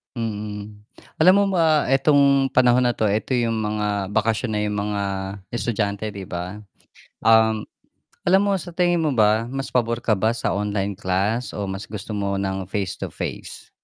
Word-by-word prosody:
Mm, 105 -2 -5 0.4
alam 180 +4 +6
mo 200 +1 +4
ba 155 -4 +3
itong 140 0 +4
panahon 125 0 +4
na 120 - +2
'to, 110 -2 0
eto 110 +6 -1
yung 115 -2 +1
mga 105 -2 -2
bakasyon 110 +2 0
na 105 - 0
yung 105 0 -2
mga 105 0 -2 0.5
estudyante 110 -3 -2
'di 95 -2 -8
ba? 90 +4 -5 0.6
Um, 110 -1 +4 0.6
alam 190 +2 +5
mo 200 -1 +1
sa 175 -1 -8
tingin 175 -1 +2
mo 150 - +1
ba 110 -1 +3
mas 135 +2 -5
pabor 115 -1 0
ka 110 -3 +1
ba 110 +4 +1
sa 120 - -2
online 100 -1 -2
class 100 +7 -1
o 100 -2 -4
mas 95 +1 -5
gusto 105 -1 -8
mo 100 -1 -1
ng 95 -1 -2
face 100 -1 -3
to - - -6
face? - - -6
110 Hz, 175 wpm, -22 LUFS, 100-125 Hz, 0.6 s, alam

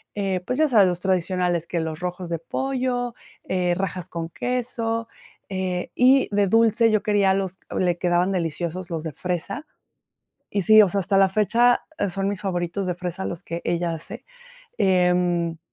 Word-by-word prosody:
eh, 195 -3 -1
pues 250 - -2
ya 310 - +5
sabes, 215 -7 +5
los 175 -1 -1
tradicionales, 180 -2 0
que 175 - -2
los 160 -1 -4
rojos 180 0 -4
de 170 -2 -2
pollo, 250 +3 -2 0.4
eh, 180 -1 +1
rajas 185 -1 -4
con 165 -1 -5
queso, 230 0 -2 0.4
eh, 185 -2 -3
y 260 +2 +5
de 205 -1 +3
dulce. 225 +2 +4
Yo 215 - +1
quería 205 -2 +3
los 190 -1 -3 0.2
le 175 -2 +1
quedaban 180 +1 +2
deliciosos 175 +1 -3
los 165 -2 -4
de 160 - -4
fresa. 185 - -4 0.8
Y 200 - 0
sí, 215 +2 +8
o 200 - +2
sea, 200 +3 0
hasta 195 +1 +1
la 195 -1 +5
fecha, 235 +5 +3 0.2
e 200 - 0
son 195 +2 -2
mis 200 -1 -4
favoritos 180 0 -2
de 180 - 0
fresa 180 +1 -5
los 170 - -5
que 170 +1 -5
ella 170 0 0
hace, 160 - -9 0.5
em 180 -2 +2
185 Hz, 175 wpm, -23 LUFS, 175-210 Hz, 0.8 s, sí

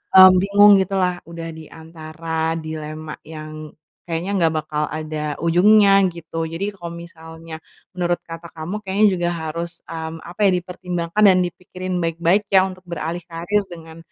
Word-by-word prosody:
eee, 185 0 +11
bingung 200 +2 +6
gitulah 190 -1 +1
udah 165 0 -7
di 160 0 -10
antara 160 0 -4
dilema 155 0 -6 0.2
yang 155 -1 -9 0.3
kayaknya 170 +3 -3
nggak 165 -2 +2
bakal 150 -1 -2
ada 155 -1 -3
ujungnya, 195 +4 +5 0.2
gitu. 165 -1 -5
Jadi 165 +6 -3
kalo 170 -2 -7
misalnya 160 -1 -10 0.4
menurut 175 -1 0
kata 165 0 -10
kamu 165 +5 -5
kayaknya 200 +3 +2
juga 175 0 0
harus, 165 +1 -5
mmm, 160 0 -6
apa 180 +4 -2
ya, - - +6
dipertimbangkan 180 +2 -2
dan 190 -2 +7
dipikirin 180 +1 -4
baik-baik 170 +4 +1
ya 190 - +8
untuk 185 0 -12
beralih 170 0 -5
karier 175 +4 -1
dengan, 165 -2 -12
170 Hz, 150 wpm, -21 LUFS, 160-180 Hz, 0.4 s, eee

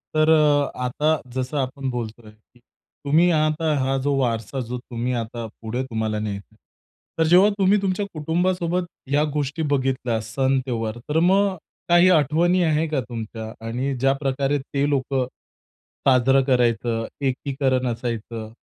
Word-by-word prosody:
तर 155 +1 +4
अ, 150 -2 +4
आता 150 +4 +1 0.2
जसं 130 +3 -2
आपण 135 0 -2
बोलतोय, 115 -2 -6
की 110 +3 -28
तुम्ही 155 +7 -1
आता 155 0 +1
हा 135 +1 0
जो 140 -1 +2
वारसा 120 0 -1
जो 125 - -3
तुम्ही 120 0 -4
आता 115 +1 -6 0.2
पुढे 120 +4 -3
तुम्हाला 110 -4 -2
न्यायचा 100 -2 -5
आहे. - - -29 0.6
तर 160 - +5
जेव्हा 185 +5 +6
तुम्ही 195 +2 +4
तुमच्या 195 +1 -1
कुटुंबासोबत 175 +2 0 0.2
ह्या 145 +1 +3
गोष्टी 145 +2 -2
बघितल्या 130 -4 0
सण, 130 +4 0
त्यौहार, 115 -2 -3
तर 155 - +2
मग 190 +3 +3 0.3
काही 175 +1 +6
आठवणी 170 +3 +3
आहे 160 0 +1
का 150 -3 -1
तुमच्या? 110 -1 -6 0.2
आणि 130 +4 -2
ज्याप्रकारे 135 +1 +1
ते 140 +1 -2
लोक 140 -1 -1 0.9
साजरं 135 +1 +4
करायचं, 120 -3 +1 0.2
एकीकरण 130 -1 0
असायचं, 115 -2 -4
135 Hz, 140 wpm, -23 LUFS, 120-155 Hz, 0.9 s, जेव्हा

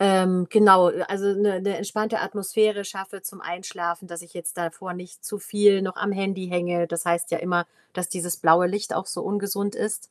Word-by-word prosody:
ähm, 185 -2 +4
genau, 195 -5 +8 0.2
also, 200 +1 -2
‘ne 200 -2 +1
‘ne 200 +1 -1
entspannte 215 +2 -2
Atmosphäre 210 0 0
schaffe 195 0 -8
zum 195 0 -8
Einschlafen, 175 0 -5
dass 170 -1 -7
ich 170 - -19
jetzt 170 -1 -6
davor 175 +2 -5
nicht 180 0 -11
zu 210 - -5
viel 205 0 +3
noch 185 -1 -3
am 205 - -1
Handy 195 -1 -3
hänge. 175 -1 0
Das 170 -1 -3
heißt 170 0 0
ja 170 - 0
immer, 175 0 0 0.3
dass 180 -1 -3
dieses 175 -1 -3
blaue 165 +2 +5
Licht 205 +4 -3
auch 190 - -2
so - - -5
ungesund 200 0 -2
ist. 215 0 -3
190 Hz, 195 wpm, -24 LUFS, 175-200 Hz, 0.3 s, genau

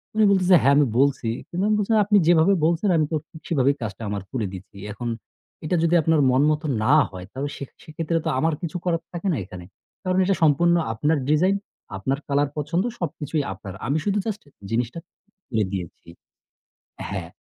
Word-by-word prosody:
উনি 220 - +4
বলতেছে, 185 -1 +5
"হ্যাঁ 140 +2 +5
আমি 145 - +5
বলছি।" 135 -4 +2 0.2
কিন্তু 180 +2 -2
আমি 215 - +3
বলছি 210 +2 -1
"আপনি 210 0 +4
যেভাবে 170 +2 +5
বলছেন 170 +5 +1
আমি 155 - +3
তো - - +1
ঠিক 160 - -13
সেভাবেই 140 -3 +2
কাজটা 110 0 -5
আমার 100 -1 -3
করে 120 -5 -2
দিছি 95 +1 -10
এখন 120 +3 -4 0.6
এটা 165 - 0
যদি 170 +1 +3
আপনার 160 -1 +3
মন 130 +2 +3
মতো 155 +1 -2 0.2
না 130 +7 +5 0.2
হয় 90 -1 -8
তাহলে 140 +2 -4
সে - - -6 0.2
সেক্ষেত্রে 165 +1 -2
তো - - +1
আমার 160 +3 +2
কিছু 170 +1 -3
করার 165 -2 +1
থাকে 175 +3 -4
না 150 - 0
এখানে। 90 -1 -10 0.4
কারণ 185 -1 +1
এটা 195 0 +2
সম্পূর্ণ 170 +3 +4 0.2
আপনার 150 +7 +1
ডিজাইন, 180 +6 +3 0.4
আপনার 135 +8 -1
কালার 140 0 +1
পছন্দ 160 +5 0 0.2
সবকিছুই 150 -2 -2
আপনার 95 -3 -9
আমি 145 +3 +1
শুধু 205 0 +1
জাস্ট 215 -2 -4 0.3
জিনিসটা 120 +7 -1 0.5
করে 110 -3 +1
দিয়েছি" 90 -3 -6 1.0
হ্যাঁ, - - -4
155 Hz, 185 wpm, -23 LUFS, 130-175 Hz, 1.0 s, বলতেছে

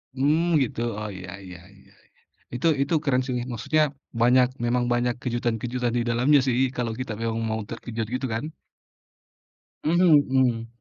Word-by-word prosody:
Mmm, 145 +5 +2 0.2
gitu. 120 - -5 0.2
Oh 105 0 -4
iya 95 0 -9 0.2
iya 90 -2 -10 0.2
iya - - -22
-iya. - - -34 0.3
Itu 125 - 0
itu 140 +4 0
keren 130 -4 +2
sih, 125 -1 -2 0.2
maksudnya 155 +7 +1 0.4
banyak 125 +1 +5 0.2
memang 120 +1 +1
banyak 120 0 0
kejutan-kejutan 120 0 -2
di - - +1
dalamnya 125 +5 +4
sih, 125 -2 +1 0.2
kalau 120 -2 -1
kita 130 -3 -4
memang 115 0 -1
mau 110 0 -2
terkejut 115 -1 -5
gitu 130 - -2
kan. 115 +7 -3 1.4
Mmm, 170 -1 +5 0.2
mhm. 120 -3 +2
120 Hz, 155 wpm, -25 LUFS, 115-130 Hz, 1.4 s, banyak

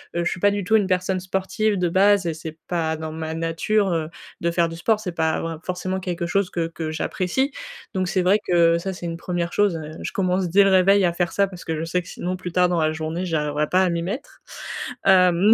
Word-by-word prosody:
heu, 170 - +1
je - - +2
suis - - -4
pas 205 +2 +4
du 205 0 -2
tout 220 +5 +2
une 205 -3 +3
personne 185 0 0
sportive 190 +3 -1
de 180 -1 +1
base 195 +2 +4
et 165 - 0
c'est 160 0 -8
pas 160 -2 -1
dans 160 0 -5
ma 160 0 -4
nature, 165 +6 0
heu, 160 -2 -1 0.3
de 170 - +1
faire 170 0 +2
du 165 - -7
sport, 210 +6 +1
c'est 200 -4 -4
pas 160 -1 0
vrai 165 0 -3
forcément 185 +1 -3
quelque 175 -2 -3
chose 195 +1 +1
que 165 -1 -1
que 165 -1 -5
j'apprécie. 185 - -1 0.4
Donc 185 -1 0
c'est 185 +1 +1
vrai 190 +4 +4
que 170 -1 +4
ça, 190 +3 -4
c'est 175 - -8
une 165 0 -4
1re 175 -1 -3
chose, 205 -5 +2
heu, 155 -1 -7
je - - -4
commence 185 -3 0
dès 200 +4 +6
le 195 - +4
réveil 190 +1 +5
à 170 - +1
faire 175 -1 -1
ça 200 0 +2
parce 185 -2 -10
que 160 - -2
je - - -2
sais 180 +2 0
que - - -16
sinon 180 +1 -4
plus 180 -1 -6
tard 180 +1 +3
dans 175 -1 +1
la 155 - +2
journée, 160 +3 -3
j'arriverai 150 -3 0
pas 185 +4 +3
à 185 - +2
m'y 170 -1 -1
mettre. 215 - -6 0.6
Hem, 185 +2 +6
180 Hz, 255 wpm, -23 LUFS, 165-190 Hz, 0.6 s, dès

